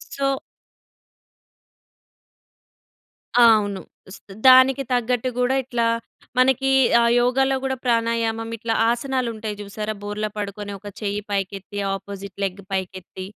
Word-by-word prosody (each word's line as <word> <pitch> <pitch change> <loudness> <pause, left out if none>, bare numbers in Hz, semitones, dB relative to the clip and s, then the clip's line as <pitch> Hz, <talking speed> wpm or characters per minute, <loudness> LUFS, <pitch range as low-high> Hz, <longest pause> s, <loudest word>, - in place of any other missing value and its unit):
So 275 -1 0 3.0
ఆ! 245 - +7
అవును. 205 -2 -3 0.3
స్ - - -14 0.3
దానికి 260 +1 +7
తగ్గట్టు‌ 245 0 0
గూడా 250 +1 +2
ఇట్లా 240 -2 0 0.5
మనకి 265 +1 +3 0.3
ఆ - - +4 0.2
యోగాలో 265 +2 +2
గూడా 265 -1 -1
ప్రాణాయామం 230 -1 0
ఇట్లా 225 0 -2 0.2
ఆసనాలుంటయి 235 -4 -2
చూసారా! 210 +1 -5
బోర్లా 210 +1 -3
పడుకొని 205 0 -5
ఒక 205 - -11
చెయ్యి 205 0 -2
పైకెత్తి, 195 +1 -3 0.2
ఆపోజిట్ 200 -1 -9
లెగ్ 195 +1 -5
పైకెత్తి. 185 0 -5
225 Hz, 110 wpm, -22 LUFS, 205-250 Hz, 3.0 s, ఆ